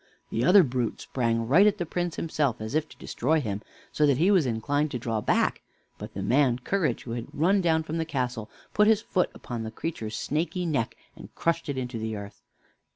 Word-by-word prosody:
The 115 - 0
other 185 +7 +7
brute 125 -4 -2
sprang 115 -2 -1
right 180 - +6
at 210 0 +2
the 175 - -2
Prince 175 +1 -2
himself, 145 -7 -1
as 110 +3 -5
if 155 0 0
to - - -15
destroy 155 +6 0
him, 105 -7 -3 0.3
so 150 - +3
that 140 -3 +3
he 175 +7 +4
was 180 -9 +4
inclined 145 +6 0
to 125 - -3
draw 115 -2 -2
back; - - +1 0.4
but - - -8
the 100 - -3
man 125 +3 +3
Courage, 180 +7 -1
who 120 - -7
had 115 0 -4
run 190 +6 +2
down 160 -2 +2
from 160 +1 -3
the - - +1
castle, 125 -7 -3 0.2
put 210 0 +4
his 220 0 +4
foot 180 - +1
upon 120 -2 -6
the 110 - -4
creature's 110 -5 -5
snaky 165 +4 -1
neck, 140 -9 -1 0.2
and - - -13
crushed 165 -2 0
it 140 - -2
into 125 -2 -3
the 110 0 -3
earth. 100 0 -9
140 Hz, 220 wpm, -27 LUFS, 115-165 Hz, 0.4 s, other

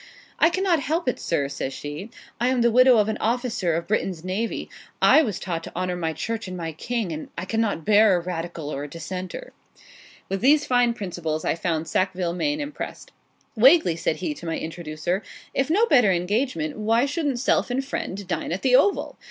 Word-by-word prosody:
'I 325 - +6
cannot 365 -2 +1
help 315 +4 -1
it, 250 - 0
sir,' 145 -5 0
says 135 -1 -4
she; 150 +9 -6 0.3
'I 240 - +2
am 255 -1 +2
the 235 0 +4
widow 255 +1 +6
of 210 -1 +3
an 220 0 -2
officer 225 -7 0
of 170 +1 -3
Britain's 190 -5 -1
Navy: 195 +5 -2 0.3
I 310 - +6
was 215 - -2
taught 170 -2 -4
to - - -10
honour 180 0 -1
my 165 -2 -2
Church 225 +7 -4
and 185 0 -6
my 165 -2 -4
King: 220 +4 -3
and 155 0 -6
I 180 - -3
cannot 215 -6 -1
bear 210 -2 +5
a - - +1
Radical 170 -3 -5
or 140 - -4
a - - -5
Dissenter.' 185 - -6 0.7
With 195 0 -3
these 290 +4 +4
fine 245 -2 +2
principles 170 -6 -4
I - - +2
found 165 -1 -2
Sackville 185 0 0
Maine 290 +11 -1
impressed. 290 -1 -6 0.4
'Wagley,' 245 - +6
said 160 -1 -1
he, 310 - -3
to 175 -12 -9
my 165 - -1
introducer, 165 +3 -3 0.3
'if 270 +2 0
no 410 +8 +4
better 245 - +5
engagement, 180 - -1
why 225 +4 +2
shouldn't 285 -2 -1
self 260 - +1
and 265 +2 -1
friend 200 -7 -4
dine 170 -3 -3
at 180 - -3
the 255 -1 +5
"Oval?" 395 +10 +2
200 Hz, 200 wpm, -24 LUFS, 170-250 Hz, 0.7 s, I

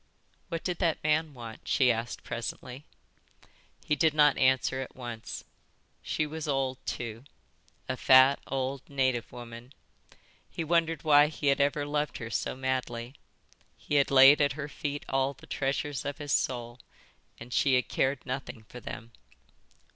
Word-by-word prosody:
"What 165 -2 -4
did 180 -2 -2
that 170 -4 0
man 155 -1 +1
want?" 115 -2 -10
she 130 -2 +4
asked 115 +1 -4
presently. 125 +3 -6 1.0
He 150 - +2
did 155 0 +2
not 150 -2 +5
answer 130 0 +2
at 130 - -8
once. 120 -3 -7 0.6
She 155 - -1
was 155 +1 -6
old 135 -2 -1
too, 115 0 -4 0.6
a - - -1
fat 130 +2 +6
old 135 0 -2
native 130 -4 0
woman. 120 +1 -10 0.8
He 165 - -4
wondered 165 -2 +1
why 145 -1 +6
he 150 -2 -1
had 140 - -1
ever 145 +1 +1
loved 150 0 -2
her 115 0 -7
so - - -2
madly. 130 -2 -3 0.6
He - - -7
had - - -2
laid 135 +2 +8
at 140 -2 +3
her 145 0 -5
feet 145 0 -5
all 135 +1 0
the - - -15
treasures 140 0 -2
of 145 - -4
his 145 -2 -3
soul, 120 -1 -1 0.6
and 120 +1 -9
she 135 -2 +3
had 125 - +1
cared 130 0 0
nothing 130 -3 -5
for 125 +3 -11
them. 115 0 -8
135 Hz, 155 wpm, -29 LUFS, 125-145 Hz, 1.0 s, laid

